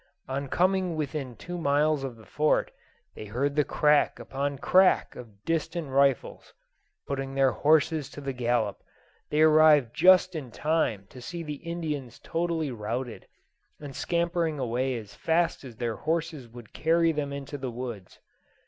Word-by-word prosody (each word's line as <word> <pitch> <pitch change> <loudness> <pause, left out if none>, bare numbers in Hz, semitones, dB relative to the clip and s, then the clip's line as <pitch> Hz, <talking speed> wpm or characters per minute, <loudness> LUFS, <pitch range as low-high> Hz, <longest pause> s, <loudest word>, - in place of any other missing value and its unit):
On 135 +1 -3
coming 185 +2 +1
within 140 -4 -4
two 175 +9 -7
miles 145 -1 +2
of 130 -3 -5
the 110 -1 -16
Fort, 150 0 +1 0.4
they - - -8
heard 130 +7 -1
the 150 - +4
crack 150 +1 +2
upon 140 +1 -3
crack 185 +7 +3
of 105 -4 -12
distant 165 -1 -2
rifles. 135 -1 +1 0.5
Putting 135 -1 -4
their 135 -1 +4
horses 155 -1 +2
to - - -10
the 140 -1 -4
gallop, 120 -4 0 0.5
they 150 - +1
arrived 155 -5 +5
just 185 +2 +6
in 150 -6 -5
time 135 -7 0
to 130 - -12
see 170 +7 -6
the 150 -2 -5
Indians 155 -7 -4
totally 165 -3 -2
routed, 115 +2 -5 0.5
and 145 -3 -9
scampering 170 -2 0
away 130 0 -1
as 105 -3 -9
fast 165 -1 0
as 125 -4 -10
their 115 -1 -3
horses 160 -4 -2
would 120 -1 -13
carry 165 +1 +2
them 150 -2 -3
into 140 +1 -6
the 130 -1 -3
woods. 120 -5 -7
145 Hz, 155 wpm, -27 LUFS, 125-160 Hz, 0.5 s, just